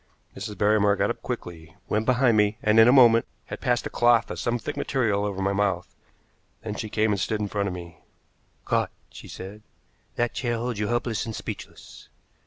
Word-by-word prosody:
Mrs. 105 +1 -6
Barrymore 105 -1 +3
got - - +1
up - - -7
quickly, 80 -1 -7
went 110 +1 -1
behind 125 -2 +3
me, 105 0 +2
and, 105 +1 +4
in 110 - +8
a - - +7
moment, 120 -4 +6 0.2
had - - -8
passed 125 -3 0
a - - -3
cloth 120 -1 +3
of - - -5
some 120 0 0
thick 110 - -5
material 110 -7 0
over 100 -2 -2
my 100 +1 +1
mouth. 100 -3 -1 0.7
Then 110 -2 -4
she 110 +1 -5
came 110 +1 +1
and 100 - 0
stood 105 +4 -1
in 105 - -1
front 100 0 -2
of 95 - -3
me. 85 -3 -10 0.7
"Caught!" - - +1 0.2
she - - -11
said. 100 +3 -9 0.5
"That 120 0 0
chair 120 -3 -1
holds 120 -2 -3
you 105 - 0
helpless 120 -2 -1
and 110 - -5
speechless. - - -9
105 Hz, 200 wpm, -25 LUFS, 100-120 Hz, 0.7 s, in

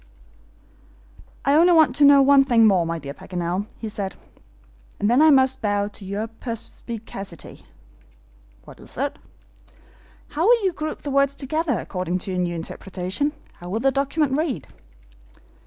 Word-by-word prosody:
"I 280 - +3
only 340 +4 +5
want 315 -6 +5
to 290 - +6
know 280 -1 +7
one 275 0 +6
thing 235 -4 +4
more, 185 -5 +3
my 165 0 -2
dear 140 -3 -7
Paganel," 180 +4 -4
he 225 - -6
said, 200 -3 -4 0.8
"and 205 - +1
then 250 +4 +4
I 315 - +7
must 265 -2 +4
bow 205 -1 0
to 210 - -12
your 200 +3 -3
perspicacity." 225 -4 -8 1.0
"What - - -14
is - - -11
it?" - - -2 1.1
"How 325 +6 0
will 470 -2 +5
you 370 - +1
group 310 0 -5
the 285 - -4
words 275 0 +2
together 290 -1 -1
according 180 0 -3
to 185 +1 -5
your 180 - -2
new 175 -1 -1
interpretation? 185 - -3 0.3
How 175 - -9
will 210 +5 -1
the 270 +3 +2
document 280 +1 0
read?" 290 - -2
230 Hz, 155 wpm, -23 LUFS, 190-285 Hz, 1.1 s, know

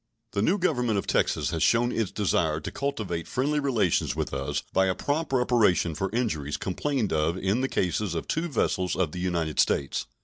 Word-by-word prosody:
The 100 -5 -1
new 175 - +3
Government 125 - +1
of 100 - -1
Texas - - +1
has - - -2
shown 120 +1 +3
its 110 -5 -1
desire 85 -6 0
to 75 - -6
cultivate 110 -12 -3
friendly 145 +4 0
relations 120 - +1
with - - -3
us 70 0 -2
by 95 0 +3
a 95 - +1
prompt 145 - -2
reparation 120 -10 +3
for 95 +5 -2
injuries 80 - -1
complained 120 +3 -1
of 80 +3 +1
in 95 +6 0
the 130 - 0
cases 90 +1 -1
of 80 - -3
two 165 +2 -1
vessels 95 - 0
of 85 -5 0
the 90 - -6
United 85 -5 -1
States. 70 - +1
100 Hz, 195 wpm, -27 LUFS, 85-125 Hz, -, new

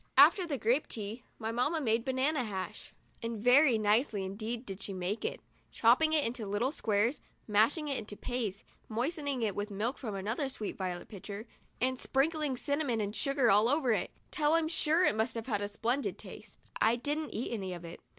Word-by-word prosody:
After 370 -4 +7
the 285 -4 -1
grape 245 +6 +1
tea, 220 +2 -6 0.2
my 220 0 -3
mamma 250 +8 +1
made 230 -4 +1
banana 265 +2 +1
hash, 190 -5 -5 0.3
and 230 0 -3
very 250 +3 +5
nicely 215 -1 +2
indeed 220 +5 -4
did 195 -1 -7
she 200 - -4
make 185 +3 -3
it, - - -3 0.3
chopping 255 +8 +4
it 305 -2 +4
into 230 -3 -3
little 210 +7 0
squares, 225 -1 0 0.3
mashing 230 +9 +3
it 275 -2 0
into 210 -1 -6
a - - -19
paste, 225 -6 -3 0.3
moistening 275 +2 -1
it 210 -3 0
with 205 +1 -3
milk 210 +6 -2
from 220 -6 -4
another 220 +8 -2
sweet 215 -5 -5
violet 180 -2 -4
pitcher, 200 +1 -7 0.3
and 255 +1 0
sprinkling 290 -1 0
cinnamon 285 -4 0
and 205 0 -2
sugar 275 -3 +2
all 210 +4 +5
over 280 -3 +2
it 205 -5 0 0.2
till 300 0 +2
I'm 330 -1 +3
sure 325 +2 +3
it - - +4
must 220 +2 0
have 225 -1 -4
had 210 -5 -1
a 205 - -1
splendid 235 +6 -1
taste. - - -11 0.2
I 225 +2 +5
didn't 295 +5 -3
eat 235 +2 -2
any 195 -5 -3
of 175 0 -9
it. 170 - -9
235 Hz, 200 wpm, -32 LUFS, 210-275 Hz, 0.3 s, After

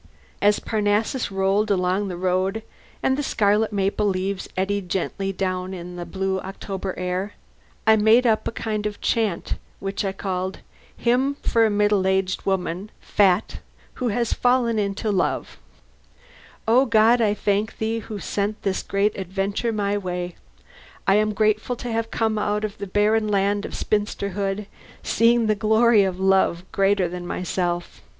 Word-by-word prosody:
As 205 0 +4
Parnassus 215 +3 0
rolled 195 +2 +1
along 190 +1 +1
the 180 -2 -5
road, 185 +4 0 0.4
and 265 - +3
the 290 - -1
scarlet 215 -4 +2
maple 200 +1 0
leaves 190 0 -2
eddied 195 0 -1
gently 195 +2 -2
down 185 0 -2
in 180 0 -8
the 175 -1 -6
blue 190 0 -1
October 195 0 -5
air, 180 +3 -2 0.5
I 220 0 +6
made 220 +4 +5
up 220 -2 +2
a - - -1
kind 215 -2 -2
of 210 - -7
chant 215 -7 -1 0.2
which 195 +1 -3
I 195 - -1
called 190 -1 -4 0.4
Hymn 255 +4 +1
for 230 -1 +3
a - - 0
Middle 205 -2 +2
Aged 190 0 0
Woman 190 +1 -1
(Fat) 195 0 +2 0.4
Who 250 - +1
Has 235 +1 0
Fallen 245 -3 +2
into 205 +1 -1
Love 190 -3 -1 1.1
O 250 +4 +5
God, 230 +1 +5
I 210 -2 +2
thank 205 +1 -1
Thee 225 +1 -1
who 220 -1 -7
sent 205 +2 -2
this 190 -1 0
great 200 +2 0
adventure 195 +4 -2
my 205 -1 0
way! 180 -2 -4 0.7
I 195 - +4
am 215 0 +2
grateful 215 +3 +1
to 240 0 -5
have 225 0 -1
come 220 -2 0
out 210 0 0
of 210 -1 -7
the 200 - -4
barren 210 +3 +2
land 205 0 +1
of - - -7
spinsterhood, 200 -1 -1 0.4
seeing 230 0 +3
the 215 - +3
glory 220 +1 +4
of 185 -1 -2
a - - -2
love 190 -2 +3
greater 195 -1 +2
than 175 0 -6
myself. 175 -1 -3
205 Hz, 160 wpm, -23 LUFS, 190-220 Hz, 1.1 s, I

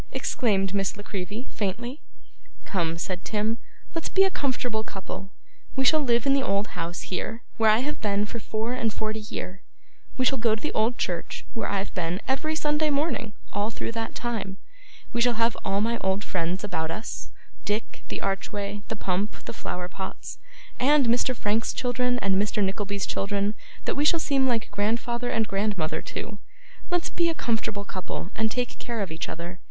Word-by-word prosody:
exclaimed 195 -5 +2
Miss 195 -1 +1
La 205 - -7
Creevy, 205 +5 -4
faintly. 240 +8 -2 0.6
'Come,' 165 -4 0
said 180 +2 -2
Tim, 220 +2 0 0.3
'let's 330 -1 -2
be 385 - +6
a 385 - +3
comfortable 245 -7 0
couple. 195 -1 -6 0.5
We 265 0 +2
shall 310 +2 +7
live 240 -5 +3
in 275 - +5
the 275 - +4
old 200 -3 +1
house 170 0 -3
here, 220 +5 -3
where 225 -1 +6
I 215 +2 +6
have 300 - -3
been 205 -1 +2
for 230 +2 -4
four 220 +2 -1
and 230 -3 +1
forty 215 +1 -1
year; 195 -3 -5 0.6
we 255 - +3
shall 270 0 +4
go 225 -2 +4
to - - -6
the 305 - 0
old 225 +2 +3
church, 175 -2 -2
where 230 - -1
I've 200 -1 -1
been, 175 +1 0
every 310 +4 +1
Sunday 300 0 +2
morning, 280 -7 +1 0.2
all 205 +2 +1
through 230 - -3
that 225 -1 -3
time; 220 -5 -2 0.6
we 235 - +2
shall 245 0 +5
have 230 +1 +3
all 195 +1 +2
my 230 +2 +2
old 190 +2 +1
friends 180 +1 -1
about 160 -6 -1
us 215 +7 -4 0.3
Dick, 210 +2 -2
the - - -4
archway, 200 +1 -1
the 225 - -2
pump, 200 +1 -1
the - - -4
flower 180 -5 -3
pots, 190 +1 -6 0.4
and 280 +2 +6
Mr. 245 +2 +3
Frank's 215 +1 +1
children, 250 0 +1
and 195 -1 +4
Mr. 210 0 +1
Nickleby's 200 +1 0
children, 200 +1 +1 0.3
that - - +2
we 285 - +1
shall 330 +2 +5
seem 275 -4 +3
like 235 -4 +1
grandfather 235 +4 +1
and 225 -2 +2
grandmother 195 -6 0
to. 205 - -5 0.5
Let's 355 -1 +1
be 340 -1 +3
a 330 - -1
comfortable 220 -6 0
couple, 185 0 -4
and 220 0 +2
take 245 +2 -2
care 235 -3 -2
of 195 - -2
each 160 - -3
other! 175 +2 -5
215 Hz, 185 wpm, -27 LUFS, 195-245 Hz, 0.6 s, shall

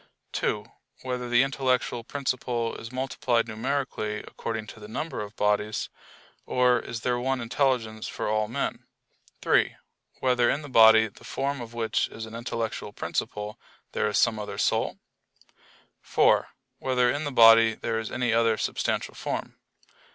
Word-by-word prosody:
(2) - - -1 0.4
Whether 125 -1 -3
the 120 +2 +5
intellectual 130 -3 0
principle 125 -3 -2
is 115 - -8
multiplied 130 -2 0
numerically 110 -2 -2
according 110 -2 -4
to 110 - -11
the 105 - -10
number 150 +5 -4
of 105 +1 -8
bodies; 105 +1 0 0.6
or 125 -1 +3
is 115 -1 -6
there 125 -1 0
one 130 +1 0
intelligence 115 -3 0
for - - -4
all 110 0 +1
men? 115 - -3 0.6
(3) - - +3 0.4
Whether 125 -2 +3
in 150 - 0
the 145 - -9
body 110 -2 +7
the 100 - -17
form 140 0 -2
of 120 0 -9
which 115 -1 0
is 110 - -8
an 110 - -11
intellectual 115 -3 -4
principle, 105 +1 -4 0.3
there - - 0
is 105 - 0
some 115 -2 +3
other 105 - -5
soul? - - +1 1.0
(4) - - +3 0.3
Whether 125 -2 +2
in 145 +4 -2
the 145 - -3
body 115 -2 +7
there 115 -1 -2
is 110 - -5
any 120 -2 0
other 115 -1 +3
substantial - - -1
form? - - -5
115 Hz, 150 wpm, -27 LUFS, 110-130 Hz, 1.0 s, body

